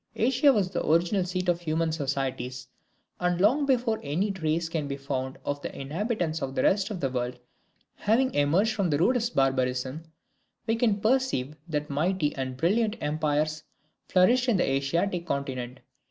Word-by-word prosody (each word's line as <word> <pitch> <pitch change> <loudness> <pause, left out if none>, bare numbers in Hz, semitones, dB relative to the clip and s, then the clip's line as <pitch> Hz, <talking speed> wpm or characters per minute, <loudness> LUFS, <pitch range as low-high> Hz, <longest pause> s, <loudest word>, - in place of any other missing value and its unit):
Asia 265 +5 +4
was 200 -7 +1
the - - -2
original 175 +5 +2
seat 185 0 -3
of 175 -1 +1
human 160 0 0
societies 135 -3 -3 0.5
and 180 -1 0
long 265 +9 +3
before 245 -4 +1
any 175 +9 -1
trace 165 -3 -1
can 160 -3 -3
be 140 0 -4
found 135 -1 -4
of 145 0 -2
the - - -6
inhabitants 165 - -2
of 135 0 -4
the 130 - +1
rest 195 +1 +2
of 205 -5 -4
the 135 - 0
world 125 -1 -2 0.6
having 250 +5 +2
emerged 170 +10 +2
from 200 -5 0
the 145 - +2
rudest 235 - +1
barbarism, 130 +1 0 0.6
we 225 0 +1
can 225 -3 +1
perceive 215 - +1
that 150 -1 -2
mighty 155 +1 0
and 130 -1 -4
brilliant 210 - +1
empires 155 0 0 0.5
flourished 245 +8 +4
in 220 - +3
the - - +1
Asiatic 170 +7 0
continent. 130 -3 -3
165 Hz, 165 wpm, -27 LUFS, 140-205 Hz, 0.6 s, Asia